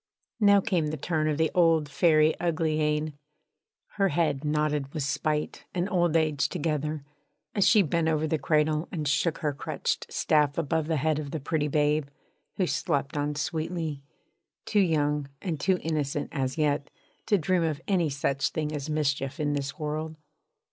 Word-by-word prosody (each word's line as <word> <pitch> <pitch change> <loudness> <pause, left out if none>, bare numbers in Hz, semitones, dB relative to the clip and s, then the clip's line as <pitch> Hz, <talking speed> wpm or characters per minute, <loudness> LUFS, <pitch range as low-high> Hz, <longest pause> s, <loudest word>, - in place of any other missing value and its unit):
Now 200 -2 +6
came 180 -7 0
the 155 +1 -3
turn 155 +1 -1
of 150 - 0
the 160 0 +1
old 165 -4 +4
Fairy 155 0 +4
Uglyane. 155 -2 0 0.8
Her 195 -1 +3
head 160 -5 0
nodded 150 -2 0
with 150 - -1
spite 150 +2 -2
and 180 +1 0
old 175 -4 +2
age 150 -4 +1
together, 150 -1 -2 0.5
as 200 - +3
she 215 -3 +6
bent 165 0 0
over 155 -1 +1
the 155 0 0
cradle 150 +2 +1
and 155 -4 -3
shook 155 +3 +1
her 145 - +1
crutched 135 - -3
staff 150 -2 +2
above 160 -1 0
the 160 -1 +1
head 155 +2 +1
of 145 -2 -5
the 160 - -4
pretty 150 +1 -1
babe, 150 0 +1 0.5
who 185 - +2
slept 140 -4 -1
on 145 0 -1
sweetly, 155 0 -3 0.6
too 210 - +2
young 150 -5 +1
and 170 -6 -3
too 190 -1 +2
innocent 150 -2 -1
as 135 -2 -2
yet 145 -2 0 0.4
to 205 - +4
dream 180 +1 +1
of 155 -3 -1
any 180 -6 +2
such 140 0 0
thing 155 -1 -3
as 150 0 -4
mischief 140 -1 -1
in 145 -1 0
this 140 -1 -3
world. 155 0 -3
155 Hz, 170 wpm, -27 LUFS, 145-165 Hz, 0.8 s, Now